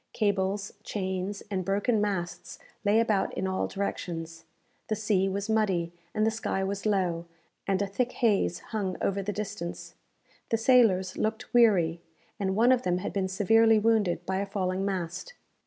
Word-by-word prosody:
Cables, 200 -1 0
chains, 190 0 -3
and 190 -2 -1
broken 205 +4 +1
masts 175 -4 -3 0.3
lay 210 +1 +4
about 215 -4 +1
in 190 - -2
all 190 0 -1
directions. 165 -4 -4 0.4
The 215 - 0
sea 205 -3 +1
was 200 +2 -3
muddy, 195 -6 +1 0.2
and 215 - +2
the 225 - +3
sky 220 -3 -2
was 200 +2 -2
low, 180 -5 0 0.4
and 195 -1 +1
a - - 0
thick 235 +6 -2
haze 200 -7 +1
hung 195 -4 -1
over 200 0 0
the 200 +2 -2
distance. 200 -4 -5 0.6
The 225 - +2
sailors 225 -6 +3
looked 220 +2 -2
weary, 180 -9 +4 0.4
and 190 -1 0
one 235 +4 +5
of 255 -1 +4
them 180 -6 0
had 185 - -4
been 195 -2 0
severely 225 +4 +4
wounded 210 -6 +2
by 190 0 -1
a 200 +1 -2
falling 190 -1 -1
mast. 190 - -3
200 Hz, 165 wpm, -28 LUFS, 185-215 Hz, 0.6 s, one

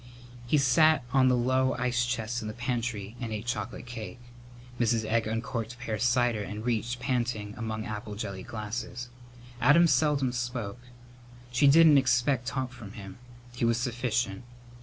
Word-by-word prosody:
He 150 - +3
sat 145 +2 +4
on 130 -1 +5
the 125 -1 +4
low 130 +1 +2
ice 125 0 0
chest 120 0 -2
in 110 - -5
the 105 - -6
pantry 120 -4 -3
and 115 -2 -4
ate 110 +1 -4
chocolate 120 0 -4
cake. 120 -1 -7 0.6
Mrs. 115 -2 +2
Egg 115 0 +1
uncorked 115 +1 -3
pear 110 -4 -4
cider 120 -1 +2
and 105 +2 -6
reached, 120 0 -1
panting, 120 -5 -2
among 110 -2 -4
apple 105 -1 -5
jelly 100 -3 -5
glasses. 115 +4 -5 0.5
Adam 145 +7 +6
seldom 140 -3 +2
spoke. 120 -3 -4 0.7
She 125 +4 +4
didn't 155 0 +7
expect 125 0 +1
talk 130 -2 -2
from 110 -5 -10
him. 95 -1 -10 0.4
He 120 - -3
was 115 0 +3
sufficient. 120 -3 -1
120 Hz, 155 wpm, -28 LUFS, 110-125 Hz, 0.7 s, didn't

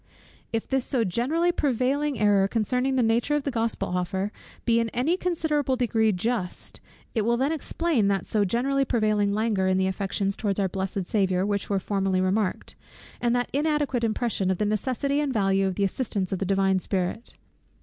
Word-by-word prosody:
If 225 -1 -2
this 265 -1 0
so 250 -3 0
generally 270 - +1
prevailing 280 -1 0
error 205 -2 +4
concerning 250 +5 0
the 255 - +3
nature 230 +6 +2
of 295 - 0
the 280 - -2
Gospel 225 -4 -1
offer 190 +3 -2 0.3
be 230 -1 +3
in 230 0 0
any 275 +9 +2
considerable 315 -7 0
degree 225 -3 +2
just; 195 -1 -3 0.3
it 225 - +1
will 235 +3 +1
then 270 +4 +1
explain 320 -6 0
that 195 -1 0
so 210 -2 +1
generally 265 +7 +1
prevailing 215 -5 +1
languor 210 -2 +1
in 185 0 +2
the 190 - +2
affections 195 +1 -1
towards 205 -2 -1
our 195 - +2
blessed 190 0 -3
Saviour 190 -2 +1
which 200 -1 -2
was 195 -2 0
formerly 195 -2 0
remarked, 185 +1 -1 0.5
and 240 0 +2
that 245 0 -1
inadequate 290 -4 0
impression 220 -4 0
of 190 - +1
the 210 - 0
necessity 255 +7 0
and 295 -2 0
value 195 -3 +2
of 190 - -2
the 200 - 0
assistance 195 -2 -1
of 190 - -1
the 195 - -1
divine 195 0 +2
Spirit. 185 +4 -3
220 Hz, 185 wpm, -26 LUFS, 195-255 Hz, 0.5 s, error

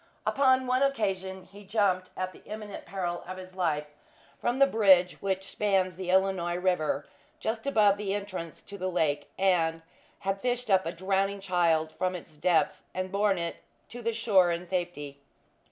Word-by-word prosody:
Upon 260 -1 +3
one 255 +1 +1
occasion 190 -8 0
he 195 +2 -15
had 200 -2 -16
jumped 195 -4 +1
at 185 0 -2
the - - -16
imminent 210 -1 -7
peril 175 -3 -3
of 185 0 -6
his 185 0 -10
life, 155 -5 0 0.5
from 240 +1 0
the 275 - +7
bridge 190 -8 +4
which 190 -1 -2
spans 190 -3 +1
the 185 0 -5
Illinois 185 -2 +2
river 180 -5 0 0.3
just 225 +4 -3
above 210 -7 +4
the 200 -1 -2
entrance 190 -5 -6
to 200 0 -10
the 185 +1 -1
lake, 150 -5 0
and 165 -4 +2 0.4
had 195 0 -2
fished 245 -2 -1
up 190 -3 +4
a - - -1
drowning 195 +3 0
child 170 -4 +1
from 185 +2 -1
its 165 -3 -9
depths 165 +2 +2
and 185 0 -3
borne 200 -1 +2
it 170 -1 -3 0.3
to 245 - -8
the 230 0 0
shore 210 -6 +4
in 170 +1 -3
safety. 175 -6 -4
190 Hz, 175 wpm, -29 LUFS, 175-205 Hz, 0.5 s, the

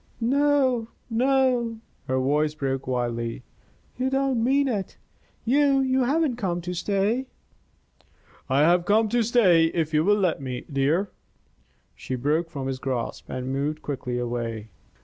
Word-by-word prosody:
"No, 260 -1 +2 0.2
no!" 250 -1 +2 0.3
Her 130 - 0
voice 150 +3 +1
broke 135 -3 -3
wildly. 120 -1 -2 0.6
"You 260 +1 +1
don't 270 -3 +1
mean 275 +3 +3
it. 205 -7 -3 0.5
You 275 +2 +3
you 260 -1 +2
haven't 285 -2 +1
come 180 -6 -1
to 180 +1 -4
stay." 205 +8 0 1.2
"I 135 +2 +3
have 175 +3 +4
come 215 +2 +3
to 240 +1 +2
stay 210 -8 +4
if 165 -1 -1
you 155 0 +3
will 205 +3 +3
let 180 -8 0
me, 125 -2 -5
dear." 155 +9 +1 0.8
She 130 - -5
broke 150 +6 0
from 140 -5 -5
his 135 -1 -3
grasp 130 -3 -4
and 130 +1 -4
moved 150 +3 -2
quickly 125 -3 -3
away. 115 -3 -4
175 Hz, 145 wpm, -25 LUFS, -, 1.2 s, have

